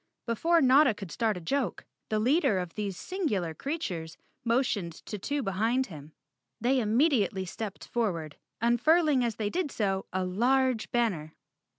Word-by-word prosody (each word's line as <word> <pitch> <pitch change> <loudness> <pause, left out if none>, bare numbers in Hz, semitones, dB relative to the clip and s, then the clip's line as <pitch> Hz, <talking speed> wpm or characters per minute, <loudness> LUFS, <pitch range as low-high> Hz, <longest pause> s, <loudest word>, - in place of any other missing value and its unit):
Before 330 +9 +2
Notta 260 -2 +6
could 195 -4 -8
start 220 -4 0
a - - -5
joke, 255 +10 -2 0.2
the 215 - +1
leader 265 - +3
of 180 -2 -3
these 200 -3 -3
singular 215 - -2
creatures 180 - -4 0.3
motioned 230 -7 0
to 210 - -5
two 285 +7 -2
behind 225 +6 +1
him. 150 0 -11 0.5
They 255 +4 +2
immediately 220 - +2
stepped 205 +2 -6
forward, 170 -10 -2 0.2
unfurling 270 +4 +3
as 230 -3 -1
they 210 -1 -2
did 360 -4 -1
so 195 -3 -1
a 185 0 -1
large 245 +5 +1
banner. 185 -11 -1
225 Hz, 150 wpm, -29 LUFS, 190-265 Hz, 0.5 s, Notta